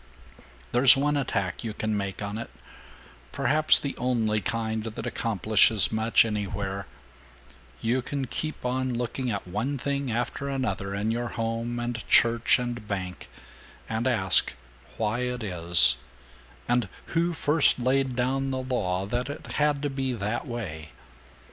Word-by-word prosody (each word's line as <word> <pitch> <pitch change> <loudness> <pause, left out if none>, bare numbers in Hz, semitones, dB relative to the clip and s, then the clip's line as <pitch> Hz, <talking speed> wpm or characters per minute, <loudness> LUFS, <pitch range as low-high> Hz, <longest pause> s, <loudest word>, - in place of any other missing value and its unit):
There's 125 +2 +6
one 145 +2 +1
attack 100 -10 -2
you 110 -2 -5
can 110 -1 -2
make 100 0 -4
on 100 +2 -4
it, 115 - -7 0.8
perhaps 145 +3 +6
the 140 - -1
only 110 -4 0
kind 110 -1 -2
that 110 -1 -6
accomplishes 110 -1 +3
much 110 +1 +3
anywhere: 100 -2 -4 0.9
you 120 +3 0
can 135 +2 -4
keep 155 +3 -4
on 130 0 -1
looking 125 +2 -3
at 100 -4 -4
one 115 +10 -2
thing 140 0 -2
after 125 +4 -3
another 120 -7 -3
in 105 +2 -1
your 120 +1 -2
home 115 +1 -3
and 120 -1 -4
church 115 0 +4
and 120 -3 -5
bank, 95 -3 -5 0.6
and 115 +3 -2
ask 95 -8 +2 0.4
why 110 +2 -1
it 125 -1 -3
is, 85 - +6 0.7
and 120 -5 +1 0.2
who 170 +1 +1
first 155 -2 +2
laid 130 +1 0
down 135 +2 -1
the 130 - -2
law 95 -8 -1
that 120 +6 -2
it 145 - -7 0.2
had 150 -1 +1
to 145 - 0
be 135 -1 -2
that 110 +5 -3
way. 85 - -6
120 Hz, 145 wpm, -26 LUFS, 105-130 Hz, 0.9 s, There's